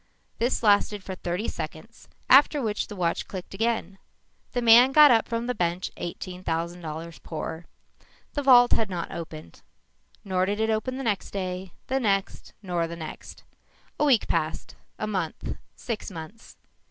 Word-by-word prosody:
This 240 +1 0
lasted 205 -1 +3
for 190 - -5
thirty 180 +3 -3
seconds - - -7 0.2
after 290 +2 +6
which 215 -5 -1
the 210 - -8
watch 175 -3 -1
clicked 185 -1 -7
again. 200 -3 -1 0.5
The 245 - 0
man 240 +3 +7
got 300 -1 +9
up 225 -2 +3
from 230 0 -2
the 250 - -1
bench 175 -2 -1
eighteen 180 +1 -6
thousand 170 +1 -2
dollars 165 +1 -7
poorer. 160 +1 -6 0.7
The 290 - -1
vault 245 -3 +7
had 220 -3 +2
not 175 -3 -4
opened. 155 - -8 0.6
Nor 185 -1 +1
did 205 +1 -1
it 220 0 +1
open 255 +4 -1
the 270 - -4
next 210 -5 -1
day, 185 -2 -4
the 265 +1 0
next, 200 -5 -1
nor 175 -3 -1
the 170 - -6
next. 160 -2 -9 0.6
A 300 - +3
week 260 -7 +4
passed, 160 -1 -2 0.2
a - - -3
month, 185 -6 -3 0.2
six 230 -3 -5
months. 180 +5 -10
195 Hz, 165 wpm, -26 LUFS, 175-230 Hz, 0.7 s, got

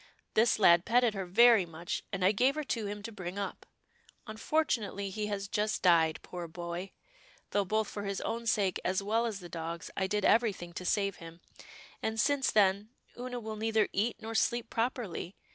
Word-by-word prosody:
This 225 +2 +4
lad 170 -4 +6
petted 240 0 +3
her 195 -3 -4
very 230 +2 +6
much, 165 +1 -4
and 195 -2 -1
I 190 - +6
gave 255 +7 +2
her 305 - -2
to 225 -6 -2
him 205 0 -6
to 230 - -6
bring 185 -2 -6
up. 200 -1 -5 0.6
Un 215 - -7
fortunately, 215 -9 -1
he 210 +1 -3
has 200 -1 -3
just 210 +2 -1
died, 165 -3 +4
poor 175 -1 -6
boy, 175 +3 -6 0.6
though 205 -1 +1
both 215 +3 0
for 205 - -6
his 200 -1 -3
own 230 0 -3
sake, 200 -4 +1
as 190 +1 0
well 225 +3 +1
as 205 -4 -5
the 175 - -8
dog's, 165 0 -6
I 190 - 0
did 210 0 0
every 230 -2 +4
thing 175 -2 -10
to 180 - -6
save 200 -1 0
him, 165 0 -11 0.6
and 220 0 -2
since 280 +4 +2
then, 200 0 +3 0.3
Oonah 245 0 -5
will 220 -1 -6
neither 220 0 +1
eat 220 +4 +1
nor 225 +1 -6
sleep 235 +1 0
properly. 225 -6 -2
205 Hz, 195 wpm, -31 LUFS, 185-225 Hz, 0.6 s, lad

